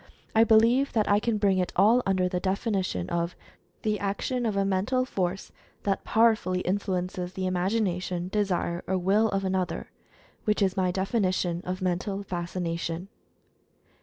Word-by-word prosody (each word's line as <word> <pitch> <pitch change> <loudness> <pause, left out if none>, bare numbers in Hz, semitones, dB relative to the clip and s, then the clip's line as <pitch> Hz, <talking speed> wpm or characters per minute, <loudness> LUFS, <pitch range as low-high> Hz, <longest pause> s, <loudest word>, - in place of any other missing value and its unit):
I 225 - +7
believe 230 +5 +4
that 215 -3 +2
I 205 0 +4
can 225 0 0
bring 200 -2 +2
it 180 - -1
all 220 +6 +5
under 185 -1 +2
the 180 0 -1
definition 190 - -1
of 170 0 -1 0.5
"The 215 -1 0
action 230 +5 -1
of 205 -2 -1
a 195 - +2
Mental 205 +7 +1
Force 190 -5 -3 0.3
that 195 -1 0
powerfully 215 -5 +2
influences 180 -1 -2
the 190 - -4
imagina 185 +1 0
tion, 180 -1 -3
desire, 185 -4 -1
or 190 - +1
will 200 +5 +3
of 195 -1 -1
another"— 185 -1 -2 0.5
which 210 -1 +1
is 190 -1 +1
my 185 -2 +1
defini 195 +1 0
tion 175 -2 -1
of 185 +1 -3
"Mental 190 +2 -1
Fascination." 175 -1 -3
190 Hz, 160 wpm, -27 LUFS, 180-210 Hz, 0.5 s, I